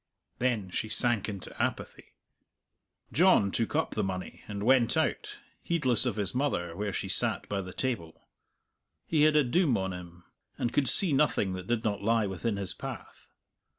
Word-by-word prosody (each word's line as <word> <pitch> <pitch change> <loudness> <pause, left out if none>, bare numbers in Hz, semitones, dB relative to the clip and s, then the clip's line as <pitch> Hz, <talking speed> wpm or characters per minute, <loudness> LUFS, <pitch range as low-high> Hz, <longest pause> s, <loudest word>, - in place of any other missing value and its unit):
Then 115 -7 -1
she 110 - -3
sank 115 -3 +1
into 100 -3 -8
apathy. - - -4 1.0
John 170 - +4
took 115 +6 -2
up 160 - 0
the 105 - -2
money 95 -1 -5
and 100 -1 -5
went 125 0 +3
out, - - -1 0.2
heedless 130 -7 +1
of 120 - -1
his 100 -3 -1
mother 105 -11 -1
where 100 +2 -3
she - - -4
sat - - +2
by 100 -1 -2
the 95 -1 -8
table; 95 -9 -4 0.9
he 155 -2 +1
had 155 0 +3
a 150 - +5
doom 140 -1 +2
on 95 -1 -3
him, 90 -1 -10 0.3
and 120 - -2
could 135 -4 +3
see 180 -7 +6
nothing 135 -9 +1
that 90 0 -7
did 120 -1 -1
not 105 -2 -1
lie 115 +1 +2
within 100 +3 -3
his 100 -2 -1
path. - - -9
110 Hz, 175 wpm, -29 LUFS, 95-130 Hz, 1.0 s, see